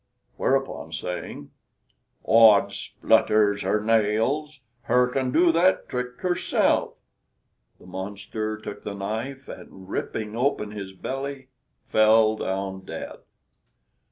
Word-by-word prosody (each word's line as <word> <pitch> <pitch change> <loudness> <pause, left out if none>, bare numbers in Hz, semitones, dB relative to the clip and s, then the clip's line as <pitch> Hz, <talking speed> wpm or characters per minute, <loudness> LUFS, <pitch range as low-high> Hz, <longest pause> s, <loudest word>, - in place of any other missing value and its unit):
Whereupon, 135 -11 -1
saying, 80 -3 -6 0.7
"Odds 105 -3 +6
splutters 100 0 +2
her 105 - +1
nails, 115 +7 0 0.2
her 125 +1 +4
can 130 0 -1
do 170 +4 +4
that 175 +3 +2
trick 125 0 -4
herself," 180 -1 +1 0.8
the - - -17
monster 100 +3 -5
took 110 -1 -9
the 100 - -5
knife, 115 +7 -5
and 95 -1 -11
ripping 110 0 -4
open 120 -4 0
his 100 -2 -7
belly, 135 +5 -5 0.4
fell 110 0 +5
down 95 -1 -3
dead. - - -7
110 Hz, 105 wpm, -25 LUFS, 100-130 Hz, 0.8 s, Odds